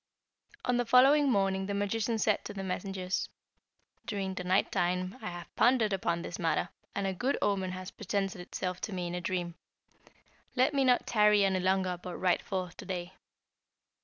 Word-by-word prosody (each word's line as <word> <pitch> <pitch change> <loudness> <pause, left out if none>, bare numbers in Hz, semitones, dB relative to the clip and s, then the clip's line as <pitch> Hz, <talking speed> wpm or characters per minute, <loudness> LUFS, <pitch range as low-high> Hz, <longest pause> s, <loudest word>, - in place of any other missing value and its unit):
"On 250 -1 +2
the 245 - +1
following 275 +4 +6
morning 195 -3 +1
the 200 - -2
magician 215 +3 0
said 215 -1 +1
to 205 - -6
the 195 - -4
messengers, 190 0 -2 0.8
'During 195 -3 -2
the 185 - -5
night 185 +2 +2
time 180 +1 0
I - - -4
have 175 0 -9
pondered 235 -4 +4
upon 170 -3 -1
this 175 - -6
matter, 170 0 0 0.3
and 200 - -1
a 190 - 0
good 255 +9 0
omen 190 -2 0
has 185 +2 -6
presented 200 -1 -2
itself 180 0 -4
to 210 - -4
me 180 -1 -3
in 175 - -4
a 180 - -3
dream. 175 -1 -2 1.0
Let 255 +3 +3
me 275 -1 +3
not 250 -1 +3
tarry 210 -2 +4
any 190 -1 +1
longer 185 -1 +1
but 180 -1 -6
ride 180 -1 +2
forth 185 -3 -4
to - - -9
day.' 180 -1 -4
190 Hz, 185 wpm, -31 LUFS, 180-210 Hz, 1.0 s, following